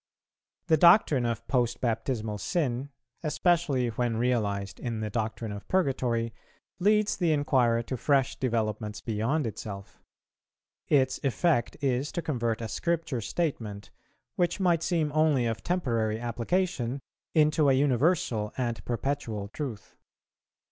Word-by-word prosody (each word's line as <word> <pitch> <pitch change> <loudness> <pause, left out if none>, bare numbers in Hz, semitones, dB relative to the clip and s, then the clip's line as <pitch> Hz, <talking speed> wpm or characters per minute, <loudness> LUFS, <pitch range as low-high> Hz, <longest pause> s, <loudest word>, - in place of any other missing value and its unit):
_ - - -52
The 160 - +4
doctrine 155 - +5
of 115 0 -3
post 120 -3 +1
baptismal 115 -2 -2
sin, 140 - -1 0.3
especially 155 -5 +1
when 115 0 -1
realized 100 -5 -1
in 115 -3 -3
the 105 -1 -3
doctrine 110 0 -3
of 100 0 -8
Purgatory, 125 -9 0 0.5
leads 210 +2 +3
the 175 -4 +1
inquirer 130 -6 +2
to 130 +2 -4
fresh 135 +1 +2
developments 110 -4 -2
beyond 115 +7 -1
itself. 100 -2 -7 0.9
Its 130 -3 +2
effect 140 -1 +1
is 135 +1 0
to 170 - -2
convert 120 -7 -1
a 115 - -3
Scripture 160 -2 -1
statement, 110 -7 -3 0.5
which 175 +2 +1
might 175 -4 +3
seem 160 -3 0
only 155 -5 +3
of 115 -1 -2
temporary 115 -11 0
application, 120 - -1 0.4
into 155 -1 +4
a - - +5
universal 130 -5 +1
and 120 -3 -2
perpetual 115 -5 -2
truth. 120 -4 -7
125 Hz, 125 wpm, -28 LUFS, 115-155 Hz, 0.9 s, doctrine